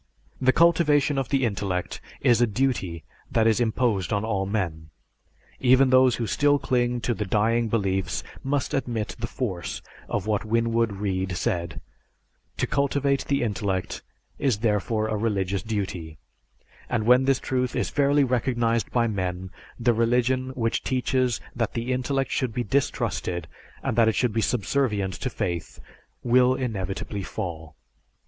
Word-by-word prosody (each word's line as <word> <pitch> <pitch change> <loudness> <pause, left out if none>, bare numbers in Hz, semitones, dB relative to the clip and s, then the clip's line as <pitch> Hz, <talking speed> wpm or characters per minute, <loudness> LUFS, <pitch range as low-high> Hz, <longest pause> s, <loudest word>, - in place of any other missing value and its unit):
The 130 0 +5
cultivation 150 -3 +3
of 135 - -3
the 135 -2 +2
intellect 95 -4 -2 0.2
is 120 -1 +4
a 120 - +5
duty 105 -8 -1 0.3
that 110 - +3
is 115 0 +3
imposed 110 -4 0
on 100 0 0
all 100 -3 -1
men. 85 -7 -3 0.7
Even 130 +1 +5
those 130 -1 +5
who 115 - -2
still 145 +5 +3
cling 120 -2 0
to 120 - 0
the 105 - -3
dying 110 +4 +1
beliefs 95 -4 -1 0.2
must 140 0 -1
admit 120 -6 -2
the 115 - -2
force 95 -10 -4 0.3
of 100 -2 -2
what 105 -2 0
Winwood 115 0 +1
Reade 95 -2 -2
said, 85 -1 -2 0.8
"To - - +1
cultivate 140 0 0
the 140 -3 +1
intellect 100 -4 -2 0.4
is 130 -7 +1
therefore 110 +1 +1
a 110 - -1
religious 100 -3 -1
duty; 95 -7 -4 0.7
and 110 -3 0
when 125 +2 +5
this 135 -1 +3
truth 125 -2 -1
is - - -1
fairly 145 0 +3
recognized 120 -2 0
by 120 -1 +2
men, 95 -4 -3 0.3
the 120 0 +3
religion 125 +3 +1
which 115 -2 0
teaches 130 -1 0 0.2
that 115 -3 -1
the 120 +2 -1
intellect 135 +2 -1
should 125 -4 -1
be 125 - 0
distrusted 90 - -1 0.4
and - - -1
that 115 -1 +5
it 110 - +2
should 125 -4 +1
be 115 - +1
subservient 105 -4 0
to - - -1
faith, 90 -8 -4 0.4
will 125 +1 +4
inevitably 100 -4 -3
fall." 80 -4 -6
115 Hz, 150 wpm, -25 LUFS, 100-130 Hz, 0.8 s, The